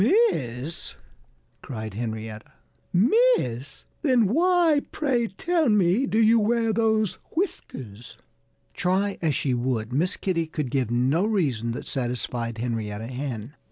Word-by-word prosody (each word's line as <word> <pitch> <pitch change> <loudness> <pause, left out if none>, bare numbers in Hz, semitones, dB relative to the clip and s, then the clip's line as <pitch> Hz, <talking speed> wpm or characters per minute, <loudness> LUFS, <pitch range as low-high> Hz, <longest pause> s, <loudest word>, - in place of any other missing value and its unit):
"Miss!" 125 +5 -5 0.7
cried 110 -5 -6
Henrietta. 110 -1 -5 0.4
"Miss! 185 - +2 0.2
Then 255 -7 +4
why, 330 - +3
pray 255 -6 0
tell 320 - 0
me, 210 +4 +3
do 220 - 0
you 225 +1 +5
wear 225 +1 +1
those 220 -2 +1 0.2
whiskers?" 125 - -4 0.6
Try 195 +3 0
as 155 -5 +1
she 135 - 0
would, 120 -2 -1
Miss 175 +8 +1
Kitty 165 -4 -1
could 150 -5 -4
give 130 -4 0
no 130 +9 +2
reason 135 - 0
that - - -6
satisfied 120 -2 -3
Henrietta 110 -2 -3
Hen. 125 -2 -5
150 Hz, 120 wpm, -25 LUFS, -, 0.7 s, you